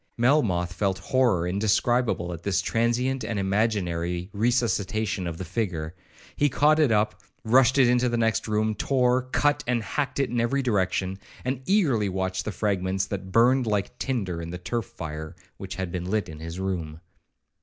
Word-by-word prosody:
Melmoth 115 - +2
felt 95 0 0
horror 120 -10 +1
indescribable 105 -1 +1
at 85 - -8
this 95 +1 0
transient 120 +3 0
and 110 0 -3
imaginary 95 -3 -1
resuscitation 110 -4 0
of 85 -1 -5
the 95 - -5
figure. 85 -9 -3 0.4
He 145 - +2
caught 150 +4 +3
it 150 -6 +4
up, 105 0 +1 0.2
rushed 130 +3 +4
into 125 -1 +4
the 120 - 0
next 115 -1 +1
room, 110 0 +1
tore, 125 +3 +2
cut, 145 +2 +1
and 120 -2 +1
hacked 140 +5 -2
it 135 -3 0
in 120 -1 +1
every 135 +4 0
direction, 95 -4 0 0.3
and 130 0 -2
eagerly 140 - +2
watched 95 0 -2
the 110 - -2
fragments 95 -2 -1
that 95 -1 -6
burned 125 +3 +4
like 105 +2 -1
tinder 100 -10 -2
in 85 - -6
the 90 - -5
turf 105 +5 -3
fire 80 -1 -7 0.2
which 95 -2 -7
had 95 -1 -4
been 90 0 -4
lit 110 0 0
in 80 -1 -9
his 80 +2 -6
room. 85 -5 -3
105 Hz, 170 wpm, -26 LUFS, 90-125 Hz, 0.4 s, it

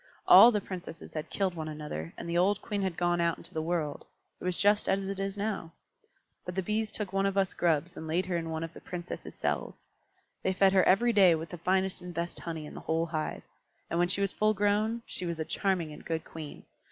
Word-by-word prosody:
All 240 - +10
the 210 - +1
Princesses 180 -4 -8
had 155 -1 -4
killed 195 -2 0
one 160 -2 -5
another, 150 - -5
and - - -6
the 170 - -2
old 190 +4 +3
Queen 205 -1 -3
had 190 -3 -2
gone 175 0 +1
out 170 -1 +1
into 180 - -10
the 160 - -1
world: 160 -3 -2 0.4
it - - -12
was 180 -1 0
just 205 +1 +3
as 195 0 +1
it 195 0 -4
is 195 +1 -2
now. 200 -6 -3 0.7
But 180 - -6
the 190 - 0
Bees 215 +2 0
took 200 -3 -4
one 195 0 +2
of 195 0 -2
us 190 -2 +2
Grubs 170 +1 +1
and 160 - -7
laid 175 +4 0
her 180 -1 -2
in 165 -1 -2
one 160 0 -3
of 165 0 -6
the - - -11
Princesses' 175 0 -7
cells. - - -3 0.5
They 190 - +1
fed 190 0 +4
her 190 - +6
every 235 +5 +4
day 185 -5 +6
with 160 +1 -5
the 175 - -7
finest 190 +2 +1
and 180 -1 -8
best 170 +1 -3
honey 160 -2 -5
in - - -9
the - - -7
whole 165 +1 0
hive; 155 -2 -3 0.5
and 170 - +1
when 175 - +4
she 190 +2 +1
was 200 -1 +1
full 215 0 +2
grown, 210 +3 +1
she 180 - -3
was 170 -1 -3
a 160 - -1
charming 180 -6 -1
and - - -11
good 160 -1 -3
Queen. 155 -3 -9
180 Hz, 245 wpm, -30 LUFS, 165-195 Hz, 0.7 s, All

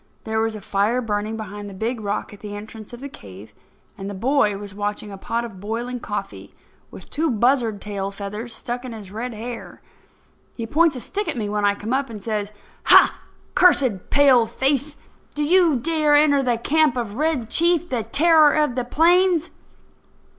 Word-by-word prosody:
There 220 0 -2
was 225 0 -1
a 210 - -8
fire 205 +5 0
burning 215 -1 -2
behind 205 -1 -7
the 195 - -10
big 225 +4 -3
rock 205 0 -3
at 205 - -13
the 205 -1 -7
entrance 215 +1 -10
of 240 +1 -10
the 280 - -5
cave, 105 - -13 0.4
and 195 -2 -7
the 205 - -6
boy 225 -1 +1
was 200 -1 -9
watching 205 0 -4
a - - -7
pot 235 +4 -2
of 205 -5 -10
boiling 235 +5 -4
coffee, - - -6 0.3
with - - -12
two 320 +2 0
buzzard 235 -2 +1
tail 200 -2 -4
feathers 205 +4 -7
stuck 240 +2 -5
in 250 -2 -7
his 205 -4 -10
red 230 +3 -5
hair. 235 +2 -7 0.8
He 230 - -3
points 310 +5 +2
a - - -4
stick 400 - -4
at 315 -5 -2
me 210 -3 -2
when 210 0 0
I 200 0 +3
come 215 +4 -4
up, 270 0 0
and 220 -2 -7
says: 210 0 -3 0.3
"Ha! - - +6 0.3
cursed 260 - +3
paleface, 275 +1 +3 0.4
do 295 - -1
you 340 -1 +4
dare 305 +2 +2
to - - +7
enter 285 -2 +4
the 245 -3 0
camp 295 +2 +2
of 230 -4 -3
Red 300 -6 0
Chief, 345 0 +3
the 250 -7 -1
terror 305 +6 +4
of 300 -4 +1
the 250 0 -2
plains? 345 +5 +3
235 Hz, 190 wpm, -22 LUFS, 210-285 Hz, 0.8 s, to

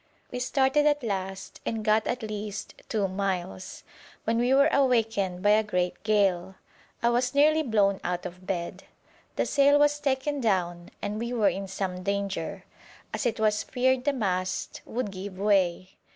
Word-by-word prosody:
We 250 - -4
started 270 +3 +2
at 290 -2 +2
last, 190 -3 -4
and 220 -2 -3
got 215 0 +3
at 245 -1 -2
least 210 -1 -5 0.2
two 210 -3 +1
miles, 185 - -4 0.4
when 230 +1 +1
we 245 +2 +2
were 280 +2 +6
awakened 225 -9 +1
by 205 - +5
a 215 +1 +5
great 180 -4 -1
gale. 195 -4 +1 0.5
I 235 - +4
was 250 +2 0
nearly 310 +2 +5
blown 205 -7 +2
out 180 0 -2
of 180 +1 -9
bed. 170 -3 -4 0.5
The - - +1
sail 285 0 +4
was 295 0 +3
taken 280 0 -1
down, 175 -6 0
and 210 +1 -2
we 235 +1 -3
were 220 -4 +3
in 195 0 -4
some 185 -1 -4
danger, 200 -3 -3 0.5
as 255 - 0
it 230 - -2
was 215 -1 +2
feared 255 0 +1
the 290 - +3
mast 185 -6 -2
would 235 -3 -3
give 190 0 -7
way. 190 -2 +1
210 Hz, 165 wpm, -27 LUFS, 190-250 Hz, 0.5 s, were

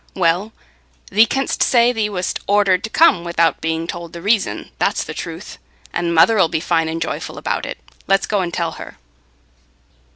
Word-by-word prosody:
"Well, 180 +4 +1 0.6
thee 220 +3 +5
canst 270 +3 -2
say 240 0 +4
thee 220 -3 -1
wast 185 -3 -3
ordered 200 -2 +3
to - - -6
come 220 - +4
without 170 -2 +1
being 160 0 -2
told 170 0 -7
the 170 - -8
reason. 210 0 0
That's - - +1
the - - -7
truth. - - -8 0.3
And 175 -1 -1
mother 185 +7 +5
'ull 175 - +5
be 160 - -2
fine 165 -1 0
and 165 +1 -3
joyful 160 - -4
about - - -3
it. - - -6 0.3
Let's 195 0 +2
go 210 - 0
and 175 -2 -2
tell 170 -2 -2
her." - - -10
180 Hz, 185 wpm, -19 LUFS, 165-210 Hz, 0.6 s, thee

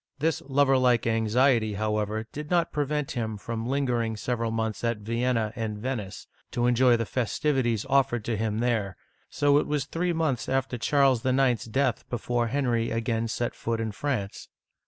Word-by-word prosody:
This 155 0 0
lover 135 -1 +3
like 125 -2 +3
anxiety, 115 0 +2
however, 105 +1 -1
did 150 +1 -7
not 175 -1 +2
prevent 150 0 -1
him 110 -4 -3
from 115 +2 -4
lingering 120 -5 0
several 115 0 -2
months 110 -1 -2
at 115 -1 0
Vienna 115 +1 -1
and 110 -3 -3
Venice, 105 -4 -4 0.3
to 120 - +1
enjoy 125 0 +4
the 115 - -1
festivities 120 0 0
offered 130 -5 +2
to 115 - -1
him 110 +1 -1
there, 110 -7 0 0.3
so 145 0 +3
it - - -2
was 145 -2 -1
three 175 +4 -1
months 160 -7 -1
after 130 -2 -1
Charles 135 0 +3
IX.*s 130 -2 +2
death 130 +2 -1
before 120 0 -1
Henry 120 -3 0
again 115 0 -1
set 120 +1 -2
foot 115 -1 -3
in 110 -1 -2
France. 105 -4 -3
120 Hz, 165 wpm, -27 LUFS, 110-135 Hz, 0.3 s, enjoy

